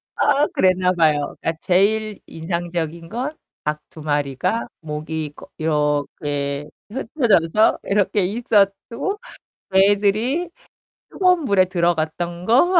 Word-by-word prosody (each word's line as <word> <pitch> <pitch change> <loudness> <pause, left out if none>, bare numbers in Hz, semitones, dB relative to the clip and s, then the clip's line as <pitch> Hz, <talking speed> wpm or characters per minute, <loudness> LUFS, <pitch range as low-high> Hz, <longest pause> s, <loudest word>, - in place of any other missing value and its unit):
아 290 +2 +3
그랬나 185 0 +3
봐요. 155 -5 +2
그러니까 165 - 0
제일 210 +3 +2
인상적인 170 0 -4
건 260 +8 -4 0.3
닭 150 0 -2
2 175 - -12
마리가 145 - -1
목이 155 -1 -4
꺼 - - -13
이렇게 145 -2 -1 0.2
흩어져서 220 - +2
이렇게 205 +1 +1
있었고 220 - 0 0.5
그 190 - +3
애들이 210 - +2 0.6
뜨거운 360 -4 +2
물에 200 -6 +4
들어갔던 170 0 -1
거? 270 +11 +4
180 Hz, 240 characters per minute, -21 LUFS, 155-215 Hz, 0.6 s, 물에